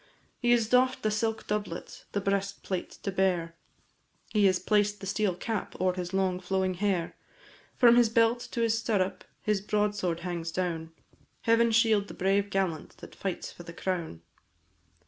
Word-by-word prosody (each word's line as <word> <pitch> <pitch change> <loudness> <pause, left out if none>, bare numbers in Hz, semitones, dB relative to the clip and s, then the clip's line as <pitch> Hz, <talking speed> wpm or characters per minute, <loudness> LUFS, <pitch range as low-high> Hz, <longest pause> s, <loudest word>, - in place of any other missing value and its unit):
He 240 - 0
has 235 -2 +4
doff'd 255 +2 +3
the 215 - +2
silk 220 +1 -1
doublet 205 -5 -4
the 200 - 0
breastplate 195 -1 -2
to 195 - -1
bear, 180 -3 +1 0.8
He 210 -2 +4
has 185 -1 +3
placed 205 +2 +1
the - - -7
steel 195 -1 0
cap 220 +4 -4
o'er 185 0 +2
his 180 -1 -4
long 190 -2 +1
flowing 185 0 0
hair, 180 -2 -1 0.6
From 240 -2 +6
his 240 -2 +5
belt 230 +1 +3
to 235 - -2
his 225 -1 +3
stirrup 210 -4 0 0.2
his 210 -2 +1
broadsword 205 -4 0
hangs 170 -2 -3
down 165 -2 -2 0.5
Heaven 230 +1 +4
shield 220 -3 +3
the - - -9
brave 195 +2 +1
gallant 190 -5 -2
that - - -12
fights 195 -2 -4
for - - -12
the 170 -1 -9
crown! 170 - -3
195 Hz, 165 wpm, -29 LUFS, 180-215 Hz, 0.8 s, From